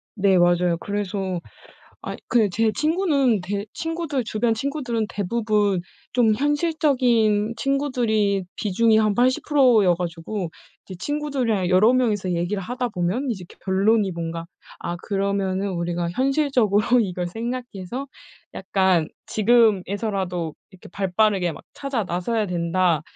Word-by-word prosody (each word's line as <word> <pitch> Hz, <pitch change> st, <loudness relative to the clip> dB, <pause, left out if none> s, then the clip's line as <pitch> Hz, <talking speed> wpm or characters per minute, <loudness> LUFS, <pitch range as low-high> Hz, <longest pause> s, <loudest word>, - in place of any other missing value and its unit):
네, 195 Hz, -2 st, +3 dB
맞아요. 175 Hz, 0 st, +3 dB
그래서 195 Hz, -3 st, -3 dB, 0.6 s
아이 -, -, -6 dB
그 225 Hz, -4 st, +3 dB
제 220 Hz, +4 st, +2 dB
친구는 295 Hz, -, +2 dB
대 200 Hz, +3 st, -3 dB
친구들 325 Hz, -5 st, -2 dB
주변 225 Hz, +1 st, 0 dB
친구들은 245 Hz, -4 st, -2 dB
대부분 210 Hz, -1 st, 0 dB, 0.3 s
좀 235 Hz, -3 st, +3 dB
현실적인 255 Hz, -7 st, +2 dB
친구들이 235 Hz, -8 st, 0 dB
비중이 220 Hz, +2 st, +2 dB
한 215 Hz, -2 st, +2 dB
80% 255 Hz, -2 st, +4 dB
여 180 Hz, -, +4 dB
가지고 175 Hz, +2 st, -4 dB, 0.3 s
이제 190 Hz, -, -9 dB
친구들이랑 260 Hz, -7 st, -1 dB
여러 210 Hz, +7 st, +5 dB
명 250 Hz, -4 st, +2 dB
이서 190 Hz, -3 st, -3 dB
얘기를 175 Hz, +3 st, -1 dB
하다 245 Hz, +4 st, -3 dB
보면 185 Hz, +9 st, -1 dB
이제 190 Hz, -5 st, -7 dB, 0.2 s
결론이 195 Hz, +1 st, +2 dB
뭔가 165 Hz, 0 st, -5 dB, 0.3 s
아, 175 Hz, -, -4 dB
그러면은 195 Hz, -1 st, -1 dB
우리가 170 Hz, -1 st, -2 dB
현실적으로 255 Hz, -, +2 dB, 0.2 s
이걸 180 Hz, -4 st, -2 dB
생각해서 240 Hz, +2 st, -5 dB, 0.5 s
약간 190 Hz, -4 st, +1 dB, 0.2 s
"지금에서라도 200 Hz, -6 st, +1 dB, 0.2 s
이렇게 185 Hz, -, -15 dB
발 195 Hz, -1 st, -3 dB
빠르게 200 Hz, -5 st, +3 dB
막 -, -, -12 dB
찾아 270 Hz, -7 st, -2 dB
나서야 205 Hz, +5 st, -1 dB
된다. 175 Hz, -2 st, +1 dB
210 Hz, 290 characters per minute, -23 LUFS, 185-245 Hz, 0.6 s, 여러